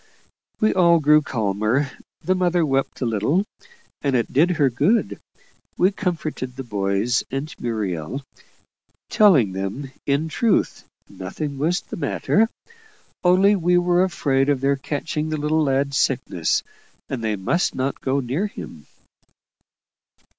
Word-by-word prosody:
We 215 - +3
all 170 -2 +5
grew 150 0 +5
calmer; 110 +3 -1 0.3
the 185 - +1
mother 175 -2 +1
wept 135 -1 -1
a - - +1
little, 115 - +1 0.6
and 140 -2 0
it 120 - -1
did 155 +7 +4
her 145 -4 +4
good: 190 - +1 0.6
we 185 +2 +4
comforted 155 -10 -3
the 135 - -6
boys 100 +1 0
and 135 +4 -4
Muriel, 110 - -3 0.9
telling 160 - +5
them 95 +8 -4
that 135 - -10 0.2
in 140 +3 +1
truth 220 +7 0 0.2
nothing 135 +10 -6
was 170 +5 +1
the - - -8
matter, 220 +5 +1 0.7
only 190 +3 +5
we 180 -1 +2
were 175 0 +3
afraid 140 -7 +1
of 140 -2 +2
their 140 +1 +2
catching 150 +2 -3
the 155 - -2
little 150 +2 +1
lad's 135 0 0
sickness, 120 -11 0 0.4
and 125 -4 -4
they 110 -1 0
must 100 - 0
not 130 +1 -2
go 135 +1 0
near 135 - -1
him. 80 - -10
140 Hz, 140 wpm, -22 LUFS, 120-170 Hz, 0.9 s, all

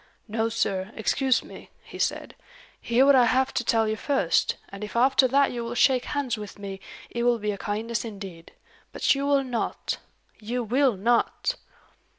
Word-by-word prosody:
"No, 225 +1 -1
sir; 195 -3 -1
excuse 260 +3 +1
me," - - -12
he - - -11
said. - - -1 0.5
"Hear 240 +3 +3
what 280 - +7
I 255 -2 +6
have 260 +3 +2
to 245 - 0
tell 225 -1 +2
you 215 - 0
first; 245 - +1
and 200 +1 -8
if 210 - -7
after 260 +2 +4
that 275 +2 +3
you 240 -1 -4
will 235 +1 -5
shake 255 +1 +3
hands 260 -6 -2
with 210 -1 -8
me, 195 -1 -7 0.3
it 235 - -3
will 240 0 +3
be 210 -1 -2
a 200 - -5
kindness 225 +2 -2
indeed. 195 -7 -9 0.4
But - - +3
you 280 0 -2
will 280 -1 +3
not! 245 -3 -3 0.4
you 240 +3 -3
will 250 0 +2
not!" 240 - +1
235 Hz, 180 wpm, -26 LUFS, 210-260 Hz, 0.5 s, what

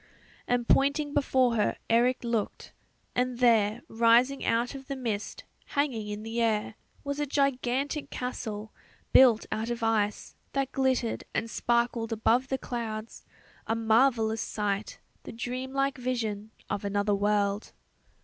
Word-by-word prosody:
And 245 -1 0
pointing 285 +1 +2
before 260 -4 +2
her 210 - +1
Eric 240 +3 +2
looked... 235 -3 -3 0.4
and 250 0 0
there, 230 -2 +3
rising 235 +4 +3
out 235 +3 +1
of 270 -1 -9
the 275 - -3
mist, 225 -6 -4 0.3
hanging 250 -7 0
in 210 0 -5
the 225 +1 -2
air, 220 -1 +1 0.3
was 280 0 -3
a 295 - -1
gigantic 275 +1 0
castle, 220 -4 -5 0.4
built 245 -4 +7
out 220 +2 -2
of 235 -1 -3
ice, 215 -2 0 0.2
that 275 -1 -1
glittered 260 -4 0
and 225 0 -1
sparkled 235 -1 0
above 230 +3 +2
the 265 - -1
clouds 225 -3 -6 0.4
a 225 - +1
marvellous 225 0 +3
sight, 205 -1 -3 0.2
the - - -9
dream 250 +3 -4
like 275 0 0
vision 220 -4 -2 0.2
of 205 0 -3
another 205 +1 0
world. 205 0 0
235 Hz, 140 wpm, -28 LUFS, 220-260 Hz, 0.4 s, built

